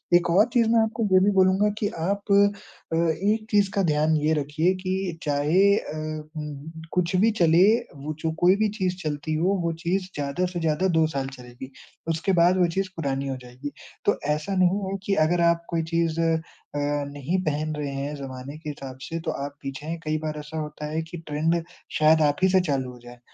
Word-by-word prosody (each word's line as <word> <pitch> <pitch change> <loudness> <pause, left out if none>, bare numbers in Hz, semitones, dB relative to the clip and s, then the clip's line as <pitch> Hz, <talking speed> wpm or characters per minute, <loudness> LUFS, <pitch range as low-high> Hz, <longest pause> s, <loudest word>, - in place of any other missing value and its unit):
एक 175 0 +3
और 195 +5 +6
चीज़ 235 -3 +4
मैं 230 0 +4
आपको 220 +1 -1
वो 190 -2 +5
भी 205 - +4
बोलूँगा 190 +1 +4
कि 205 - +1
आप 200 +5 -2
अ, 200 -4 +1
एक 190 +7 +1
चीज़ 205 -2 +4
का 200 - +3
ध्यान 155 -1 +2
ये 155 +1 +1
रखिए 155 +4 +1
कि 185 -2 -2
चाहे 155 +7 +3
अ, - - -5 0.4
उम, 150 0 -6 0.2
कुछ 180 0 +1
भी 220 +5 +4
चले 170 +1 +6 0.3
वो 145 +2 -5
जो 160 0 -1
कोई 180 +2 +5
भी 215 0 +2
चीज़ 185 -1 0
चलती 150 0 -2
हो 180 +6 +2
वो 170 - +1
चीज़ 185 +2 0
ज़्यादा 145 +5 -1
से 175 - -2
ज़्यादा 165 +3 +1
2 160 - +5
साल 140 -3 -3
चलेगी, 125 +2 -10 0.4
उसके 165 +4 0
बाद 180 +2 +5
वो 180 -1 +4
चीज़ 195 0 0
पुरानी 140 -3 -2
हो 135 -1 -3
जाएगी। 125 +3 -8 0.3
तो 205 - +2 0.2
ऐसा 175 +6 -3
नहीं 185 +1 +3
है 195 - -2
कि 200 - +1
अगर 175 +1 +1
आप 170 0 -3
कोई 165 -1 0
चीज़ 165 -1 +1
अ, 165 -1 +2 0.8
नहीं 160 +7 -1
पहन 155 -1 -1
रहे 145 -2 -3
हैं 140 +2 -4
ज़माने 135 +1 -7
के 155 -1 -7
हिसाब 135 -3 -7
से 165 +4 -4
तो - - +2
आप 140 0 -8
पीछे 135 +1 -6
हैं 165 +1 -3
कई 155 0 0
बार 155 -1 -3
ऐसा 150 +2 -7
होता 150 0 -5
है 160 +1 -1
कि 165 +2 -8
ट्रेंड 160 +3 +1 0.4
शायद 155 +1 +5
आप 145 -1 +3
ही 190 - +6
से 190 0 +5
चालू 135 -7 -1
हो 125 - -13
जाए, 120 0 -12
160 Hz, 210 wpm, -25 LUFS, 150-185 Hz, 0.8 s, और